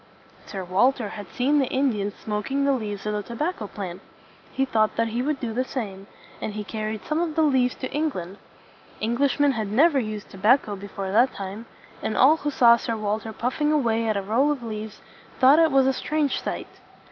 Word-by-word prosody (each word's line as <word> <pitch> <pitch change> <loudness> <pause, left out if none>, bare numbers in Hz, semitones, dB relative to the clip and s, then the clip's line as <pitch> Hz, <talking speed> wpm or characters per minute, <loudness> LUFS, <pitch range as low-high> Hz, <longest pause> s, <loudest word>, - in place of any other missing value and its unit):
Sir 195 -2 -5
Walter 210 +5 +2
had 205 0 -8
seen 280 +4 +1
the 270 - +1
Indians 220 -7 0
smoking 225 +7 -2
the 280 - +3
leaves 210 -6 -3
of 210 - -1
the 210 - -1
to 235 +3 -9
bac 330 +9 -1
co 210 - -6
plant. 190 -3 -7 0.5
He 270 - 0
thought 215 -4 +1
that 230 0 +1
he 235 +2 -2
would 285 +1 -1
do 230 -3 -3
the 255 +3 0
same, 200 -7 -6 0.3
and 210 - -3
he 210 0 -4
carried 215 +1 -5
some 310 +2 0
of 325 -3 -2
the 320 - +3
leaves 260 -4 +2
to 260 - -6
England. 205 - -3 0.6
Englishmen 275 +5 +2
had 220 -5 -2
never 280 +8 +4
used 215 -3 -5
tobacco 210 +2 +2
before 195 -1 -6
that 240 +6 +3
time; 200 +4 -7 0.3
and 215 - -2
all 300 +5 +6
who 295 - -2
saw 235 -4 +6
Sir 230 -1 -3
Walter 215 +1 -2
puff 250 +6 -3
ing 300 0 +3
away 230 -6 +1
at 215 -2 +1
a 200 - -2
roll 240 +9 +2
of 275 -5 -3
leaves 215 -1 -6 0.4
thought 270 +3 +7
that 330 - +6
it 315 - 0
was 270 -1 +4
a 265 - +3
strange 295 0 -1
sight. - - -6
230 Hz, 215 wpm, -24 LUFS, 210-275 Hz, 0.6 s, thought